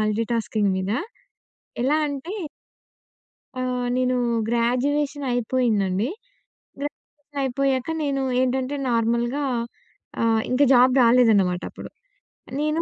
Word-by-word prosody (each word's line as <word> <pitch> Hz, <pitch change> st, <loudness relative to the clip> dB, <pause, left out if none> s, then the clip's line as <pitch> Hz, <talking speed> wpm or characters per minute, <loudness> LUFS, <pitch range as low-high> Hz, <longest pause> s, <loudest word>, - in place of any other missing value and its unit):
Multitasking 215 Hz, -1 st, 0 dB
మీద. 190 Hz, +2 st, -2 dB, 0.9 s
ఎలా 290 Hz, +4 st, +2 dB
అంటే 285 Hz, +6 st, -5 dB, 1.3 s
ఆహ్, 250 Hz, -1 st, -1 dB
నేను 255 Hz, 0 st, +1 dB, 0.3 s
గ్రాడ్యుయేషన్ 275 Hz, +5 st, 0 dB
అయిపోయిందండి. 220 Hz, -4 st, +1 dB, 0.7 s
గ్రాడ్యుయేషన్ 290 Hz, 0 st, -8 dB
అయిపోయాక 265 Hz, +1 st, 0 dB
నేను 275 Hz, -1 st, 0 dB, 0.2 s
ఏంటంటే, 260 Hz, +2 st, 0 dB
నార్మల్‍గా 235 Hz, +4 st, 0 dB, 0.8 s
ఆహ్, 225 Hz, -1 st, +3 dB
ఇంకా 265 Hz, +3 st, +3 dB
జాబ్ 250 Hz, +1 st, +6 dB
రాలేదనమాట 220 Hz, -7 st, +4 dB
అప్పుడు. -, -, -10 dB, 0.7 s
నేను 305 Hz, +2 st, 0 dB
250 Hz, 90 wpm, -23 LUFS, 230-275 Hz, 1.3 s, జాబ్